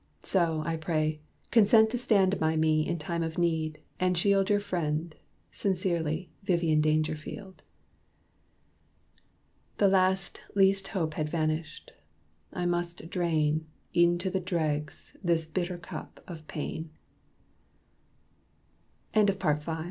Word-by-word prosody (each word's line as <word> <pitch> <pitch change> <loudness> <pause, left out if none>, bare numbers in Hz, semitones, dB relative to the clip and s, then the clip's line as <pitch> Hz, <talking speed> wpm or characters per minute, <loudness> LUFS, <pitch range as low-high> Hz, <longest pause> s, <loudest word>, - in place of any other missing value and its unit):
So, 165 -4 +1
I 165 0 -1
pray, 155 -1 -1 0.3
consent 220 0 +6
To 245 - -1
stand 195 -5 +3
by 160 0 +1
me 155 -1 +2
in 170 - -1
time 170 +2 -3
of 160 -1 -3
need, 160 -3 0 0.2
and 180 -1 +2
shield 195 +2 +3
Your 205 -1 +4
friend 165 -4 -2 0.4
sincerely, 170 - -1
Vivian 170 -5 +2
Dangerfield." 155 +5 -2 2.2
The 200 - +5
last 190 0 +2
least 195 0 +4
hope 165 -6 -2
had 155 -1 -2
vanished; 155 -1 -2 0.6
I 180 - -3
must 175 -1 -2
drain, 155 -3 +1 0.3
E'en 175 0 +5
to 185 +2 -2
the 190 - 0
dregs, 155 -5 -3
this 170 -2 +2
bitter 175 +2 -3
cup 175 - -9
of 160 -3 -9
pain. 160 +1 -5 2.2
_PART 195 -8 +2
VI. 160 +1 -4
170 Hz, 120 wpm, -29 LUFS, 155-190 Hz, 2.2 s, consent